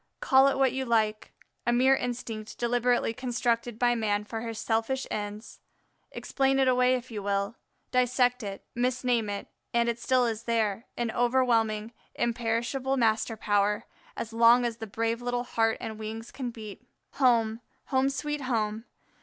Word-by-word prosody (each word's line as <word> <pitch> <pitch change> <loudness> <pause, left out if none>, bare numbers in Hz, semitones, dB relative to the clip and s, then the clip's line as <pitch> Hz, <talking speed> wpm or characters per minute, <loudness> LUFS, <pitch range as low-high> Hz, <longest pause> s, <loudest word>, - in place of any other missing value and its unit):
Call 265 +1 +5
it 275 - +1
what 270 -2 +3
you 265 0 -1
like, 220 -3 0 0.4
a - - +4
mere 260 +3 +5
instinct 235 -4 -5
deliberately 240 -1 +1
constructed 240 -2 -1
by 240 0 +3
man 210 -3 0
for 225 +1 -5
his 230 -1 -5
selfish 225 +5 -1
ends, 210 +1 -5 0.5
explain 270 -1 0
it 265 -1 +3
away 250 0 +4
if 250 0 -6
you 210 -2 -4
will, 200 +2 -1 0.4
dissect 250 0 +2
it, 200 -2 -6
misname 245 -2 0
it, 200 0 -4 0.3
and 235 0 +3
it 235 0 -1
still 255 0 +2
is 230 -1 -3
there, 225 -1 0
in 235 -2 -1
overwhelming, 230 -3 +1 0.2
imperishable 240 +3 -1
master 225 -1 +1
power, 205 0 +1 0.3
as 225 - -5
long 235 +2 +6
as 230 -1 -2
the 225 -2 -6
brave 230 +3 -1
little 245 0 -1
heart 225 -2 +1
and 220 -1 -6
wings 220 +1 -6
can 260 -2 -4
beat. 215 -4 -9 0.4
Home, 230 -3 +3 0.3
home, 265 0 +2
sweet 295 +1 -3
home! 225 -3 -1
235 Hz, 160 wpm, -28 LUFS, 220-250 Hz, 0.5 s, long